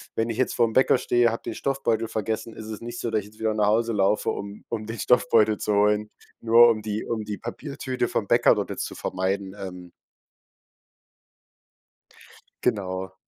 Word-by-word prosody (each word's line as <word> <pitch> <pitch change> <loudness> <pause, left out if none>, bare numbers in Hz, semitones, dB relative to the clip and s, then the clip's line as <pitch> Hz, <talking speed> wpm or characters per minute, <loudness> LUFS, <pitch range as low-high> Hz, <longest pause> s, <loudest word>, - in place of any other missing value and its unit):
Wenn 115 +1 0
ich 115 - -3
jetzt 130 - 0
vorm 115 -2 +2
Bäcker 130 +1 +4
stehe, 120 -1 +2
habe 115 - -5
den - - -4
Stoffbeutel 125 -5 -1
vergessen, 110 +1 -3
ist 110 - -8
es 110 -1 -7
nicht 120 +1 -6
so, 115 - -3
dass 110 - +2
ich 100 - -8
jetzt 110 +1 -19
wieder 110 -1 0
nach 105 -1 +1
Hause 115 +2 +2
laufe, 100 +1 +2
um 100 +1 -5
um 110 -2 -4
den 115 +2 -6
Stoffbeutel 110 -3 +3
zu 105 - -1
holen, 105 +1 +2 0.3
nur 115 +1 +7
um 110 -2 0
die 105 0 -3
um 115 -2 -3
die 105 -1 -4
Papiertüte 130 0 -4
vom - - -2
Bäcker - - +5
dort - - -3
jetzt - - -3
zu - - -8
vermeiden, 95 +1 -2
ähm. 90 -2 -8 2.7
Genau. 95 -1 -1
110 Hz, 185 wpm, -25 LUFS, 105-115 Hz, 2.7 s, nur